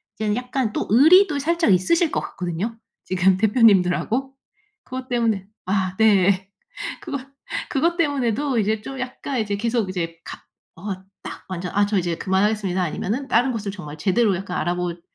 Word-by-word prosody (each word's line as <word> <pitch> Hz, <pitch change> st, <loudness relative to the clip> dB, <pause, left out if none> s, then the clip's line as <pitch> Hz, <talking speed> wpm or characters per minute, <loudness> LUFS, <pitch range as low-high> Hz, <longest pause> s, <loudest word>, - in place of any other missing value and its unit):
이제는 210 Hz, -1 st, -1 dB
약간 250 Hz, -1 st, -2 dB
또 -, -, -2 dB
의리도 305 Hz, -, +6 dB
살짝 330 Hz, -, +2 dB
있으실 320 Hz, -, +2 dB
것 -, -, 0 dB
같거든요 180 Hz, +6 st, -4 dB, 0.3 s
지금 185 Hz, 0 st, +2 dB
대표님들하고. 220 Hz, +4 st, +3 dB, 0.5 s
그것 255 Hz, +1 st, -7 dB
때문에 230 Hz, -5 st, 0 dB, 0.2 s
아 185 Hz, -1 st, 0 dB
네. 195 Hz, -3 st, +3 dB, 0.5 s
그것 285 Hz, -4 st, -4 dB, 0.5 s
그것 335 Hz, +5 st, +1 dB
때문에도 280 Hz, -, 0 dB
이제 215 Hz, +1 st, 0 dB
좀 270 Hz, +4 st, -7 dB
약간 255 Hz, +1 st, -4 dB
이제 205 Hz, -2 st, -1 dB
계속 230 Hz, -1 st, 0 dB
이제 165 Hz, -3 st, -4 dB
갑 -, -, -9 dB, 0.3 s
어 195 Hz, +3 st, -4 dB, 0.3 s
딱 -, -, -8 dB
완전 180 Hz, -1 st, -4 dB
'아 205 Hz, 0 st, +4 dB
저 205 Hz, 0 st, 0 dB
이제 175 Hz, -2 st, 0 dB
그만하겠습니다.' 190 Hz, 0 st, 0 dB
아니면은 215 Hz, -, -3 dB
다른 255 Hz, +1 st, +3 dB
곳을 215 Hz, -4 st, -3 dB
정말 155 Hz, -7 st, -9 dB
제대로 200 Hz, +5 st, +2 dB
약간 185 Hz, -1 st, -5 dB
알아보지 175 Hz, -1 st, -2 dB
210 Hz, 350 characters per minute, -22 LUFS, 185-255 Hz, 0.5 s, 의리도